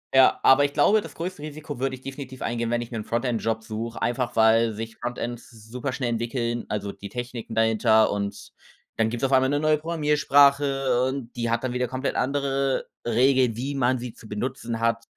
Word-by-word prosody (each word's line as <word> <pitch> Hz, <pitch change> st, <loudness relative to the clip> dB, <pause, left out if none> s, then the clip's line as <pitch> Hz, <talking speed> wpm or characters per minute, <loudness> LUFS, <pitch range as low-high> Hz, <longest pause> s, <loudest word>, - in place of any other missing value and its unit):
ja, 130 Hz, -1 st, +6 dB
aber 140 Hz, +2 st, +6 dB
ich 140 Hz, -, -3 dB
glaube, 205 Hz, +9 st, +4 dB
das 165 Hz, -6 st, -10 dB
größte 165 Hz, 0 st, -6 dB
Risiko 150 Hz, -2 st, -7 dB
würde 135 Hz, 0 st, -1 dB
ich 130 Hz, -, -16 dB
definitiv 135 Hz, -1 st, -8 dB
eingehen, 120 Hz, 0 st, -2 dB
wenn 120 Hz, 0 st, +1 dB
ich 120 Hz, -, -7 dB
mir 115 Hz, -, -5 dB
'n 105 Hz, -, -4 dB
Frontend-Job 115 Hz, -2 st, -1 dB
suche, 115 Hz, +1 st, -5 dB
einfach 120 Hz, 0 st, -1 dB
weil 115 Hz, 0 st, +4 dB
sich 115 Hz, +1 st, -6 dB
Frontend 120 Hz, 0 st, -4 dB
s -, -, -18 dB
superschnell 125 Hz, +3 st, -4 dB
entwickeln 115 Hz, 0 st, -2 dB
also 100 Hz, -1 st, -3 dB
die 100 Hz, 0 st, -10 dB
Techniken 120 Hz, -1 st, -6 dB
dahinter. 110 Hz, 0 st, +3 dB
Und 100 Hz, 0 st, -4 dB, 0.5 s
dann 110 Hz, -1 st, +2 dB
gibt's 120 Hz, +3 st, -2 dB
auf 135 Hz, -, 0 dB
einmal 130 Hz, 0 st, +4 dB
'ne 145 Hz, -, +1 dB
neue 155 Hz, 0 st, +3 dB
Programmiersprache 145 Hz, -4 st, +3 dB
und 130 Hz, -3 st, -6 dB
die 115 Hz, -1 st, -2 dB
hat 115 Hz, +2 st, 0 dB
dann 125 Hz, -, -2 dB
wieder 125 Hz, -1 st, -1 dB
komplett 130 Hz, +2 st, -2 dB
andere 135 Hz, 0 st, 0 dB, 0.2 s
Regeln, 125 Hz, 0 st, +3 dB
wie 135 Hz, +4 st, -3 dB
man 130 Hz, -1 st, +1 dB
sie 120 Hz, -2 st, -6 dB
zu 110 Hz, -, -15 dB
benutzen 120 Hz, +1 st, -3 dB
hat. 115 Hz, 0 st, 0 dB
125 Hz, 200 wpm, -25 LUFS, 115-135 Hz, 0.5 s, ja